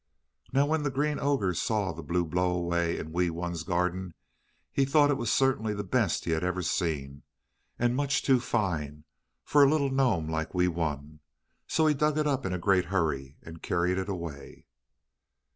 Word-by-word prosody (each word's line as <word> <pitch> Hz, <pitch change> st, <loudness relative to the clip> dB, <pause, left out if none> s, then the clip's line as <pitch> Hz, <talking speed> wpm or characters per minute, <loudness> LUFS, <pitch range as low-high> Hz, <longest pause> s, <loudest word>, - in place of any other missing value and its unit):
Now 135 Hz, +2 st, +3 dB
when 155 Hz, +1 st, 0 dB
the 145 Hz, -, 0 dB
Green 145 Hz, +2 st, -1 dB
Ogre 135 Hz, -11 st, +1 dB
saw 100 Hz, +2 st, 0 dB
the 85 Hz, +1 st, -8 dB
blue 85 Hz, +3 st, -1 dB
blow 90 Hz, +3 st, 0 dB
away 85 Hz, -1 st, 0 dB
in 80 Hz, -, -6 dB
Wee 90 Hz, +1 st, +1 dB
Wun's 85 Hz, 0 st, -4 dB
garden 90 Hz, +1 st, -2 dB, 0.6 s
he 135 Hz, -, +2 dB
thought 145 Hz, +1 st, +4 dB
it -, -, +2 dB
was 120 Hz, -4 st, -1 dB
certainly 120 Hz, -6 st, +1 dB
the 105 Hz, -, -3 dB
best 105 Hz, -2 st, 0 dB
he 85 Hz, -, -1 dB
had 80 Hz, +1 st, 0 dB
ever 90 Hz, 0 st, -1 dB
seen, 70 Hz, -5 st, -2 dB, 0.6 s
and 120 Hz, 0 st, +1 dB
much 140 Hz, +1 st, 0 dB
too 130 Hz, -2 st, +4 dB
fine 80 Hz, -, -2 dB, 0.4 s
for 145 Hz, -1 st, +5 dB
a 140 Hz, -, +6 dB
little 140 Hz, -2 st, +1 dB
gnome 125 Hz, -12 st, +1 dB
like 80 Hz, +2 st, -3 dB
Wee 90 Hz, 0 st, +3 dB
Wun. 75 Hz, -3 st, -3 dB, 0.5 s
So 160 Hz, -, +2 dB
he 155 Hz, -, +4 dB
dug 150 Hz, +1 st, +1 dB
it 155 Hz, -, +1 dB
up 135 Hz, -5 st, 0 dB
in -, -, -3 dB
a 90 Hz, -, -1 dB
great 90 Hz, 0 st, +2 dB
hurry 75 Hz, -7 st, -2 dB
and 80 Hz, 0 st, -11 dB
carried 90 Hz, +2 st, 0 dB
it 95 Hz, +2 st, -4 dB
away. 85 Hz, -7 st, -7 dB
90 Hz, 190 wpm, -28 LUFS, 85-135 Hz, 0.6 s, a